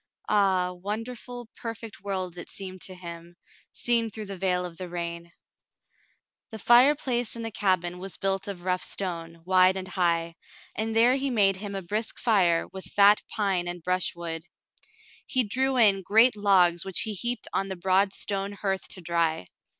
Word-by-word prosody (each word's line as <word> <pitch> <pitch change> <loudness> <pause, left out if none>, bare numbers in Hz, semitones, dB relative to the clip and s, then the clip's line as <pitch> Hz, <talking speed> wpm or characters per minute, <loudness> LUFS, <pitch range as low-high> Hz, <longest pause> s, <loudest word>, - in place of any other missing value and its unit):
Ah, 190 -3 +2
wonderful, 225 +5 -6
perfect 225 -3 -8
world 185 -3 -3
it 175 - -8
seemed 185 -2 -7
to 185 - -4
him, 170 -1 -9 0.4
seen 235 -2 0
through 215 +1 -7
the 195 -1 -6
veil 180 -1 0
of 170 -2 -9
the 185 -1 -6
rain. 170 0 -5 1.2
The 220 - -7
fireplace 245 +1 +4
in 230 - -5
the 225 - -3
cabin 180 -3 0
was 190 +1 -4
built 195 0 -1
of 190 -3 -7
rough 185 0 0
stone, 165 -3 -3
wide 185 0 +4
and 190 0 -5
high, 170 -2 0 0.4
and 220 +1 -2
there 240 +3 +5
he 275 0 -1
made 200 -6 +3
him 200 0 -6
a 195 - -4
brisk 210 +5 -3
fire 180 -7 +3
with 190 -1 -7
fat 205 +1 +5
pine 190 -4 0
and 175 -1 -5
brushwood. 170 -2 -1 0.9
He 255 -2 +2
drew 260 +5 0
in 205 -5 +5
great 225 +5 +4
logs 185 -4 +4
which 190 -2 +1
he 220 - -2
heaped 240 +5 -2
on 195 - 0
the 190 - -4
broad 190 +2 +2
stone 200 0 -3
hearth 195 -1 -3
to 185 - -4
dry. 165 - 0
195 Hz, 170 wpm, -26 LUFS, 180-215 Hz, 1.2 s, there